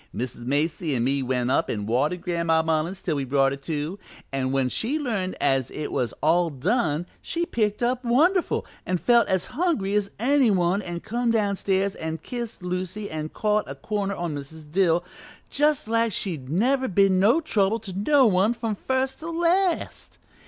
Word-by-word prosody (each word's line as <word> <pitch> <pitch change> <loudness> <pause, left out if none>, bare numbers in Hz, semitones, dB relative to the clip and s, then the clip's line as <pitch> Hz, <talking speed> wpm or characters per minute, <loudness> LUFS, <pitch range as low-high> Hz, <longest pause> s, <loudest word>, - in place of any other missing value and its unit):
"Mrs. 120 -1 -5
Macy 155 +2 0
an' 120 - 0
me 135 +2 +1
went 125 -1 0
up - - +1
an' 105 -2 -2
watered 145 +10 0
Gran'ma 170 -2 +1
Mullins 160 +4 -1
till 160 - 0
we 140 - -1
brought 135 +1 +2
her - - -2
to, 150 +6 -4 0.3
and 130 -1 -1
when 135 -1 +1
she 235 - -1
learned 220 -11 -2
as 135 -3 +1
it 150 - -5
was 120 -4 -1
all 170 +2 +3
done 155 - 0 0.2
she 340 0 -2
picked 215 -5 -1
up 250 +1 0
wonderful 325 +10 +2 0.2
and 180 -1 -1
felt 235 +1 +4
as 190 -2 0
hungry 275 - 0
as 205 -1 +1
any 265 +1 +4
one, 185 0 +2
an' 175 -3 -5
come 240 +2 -1
downstairs 200 -3 +1
an' 160 0 -4
kissed 235 +4 -6
Lucy 185 +3 -4
an' 155 0 -4
caught 210 +3 0
a - - -5
corner 200 -2 -2
on 175 -3 -3
Mrs. 150 +2 -8
Dill 175 -1 +3 0.5
just 295 -4 +1
like 230 0 +1
she'd 160 -10 -3
never 260 - +2
been 195 -2 +3
no 225 - +5
trouble 220 -9 +1
to 200 -4 -7
no 260 +8 +4
one 205 +2 +3
from 225 -2 -2
first 260 +5 -1
to 320 - -6
last. 345 +2 0
190 Hz, 180 wpm, -25 LUFS, 155-235 Hz, 0.5 s, no